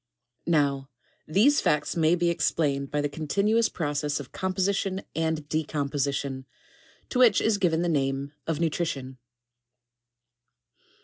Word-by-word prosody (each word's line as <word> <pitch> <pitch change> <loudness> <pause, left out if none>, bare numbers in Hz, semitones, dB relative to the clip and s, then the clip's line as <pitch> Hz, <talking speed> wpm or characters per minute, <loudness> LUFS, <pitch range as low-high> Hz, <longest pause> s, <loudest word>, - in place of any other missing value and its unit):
Now, 140 -4 +1 0.4
these 225 - +4
facts 150 -1 +1
may 165 0 +3
be 175 -1 +1
explained 140 -5 0
by 150 - -1
the 145 - 0
continuous 200 +10 +1
process 145 -2 -2
of 140 - -9
composition 190 +1 -1
and 160 -2 -1
de 155 +1 0
composition, 140 -2 -2 0.6
to 250 - -1
which 240 -5 +6
is 215 -2 +1
given 170 -3 +2
the - - 0
name 140 -2 -1
of 160 -2 -1
nutrition. 145 -6 -2
155 Hz, 125 wpm, -26 LUFS, 140-180 Hz, 0.6 s, which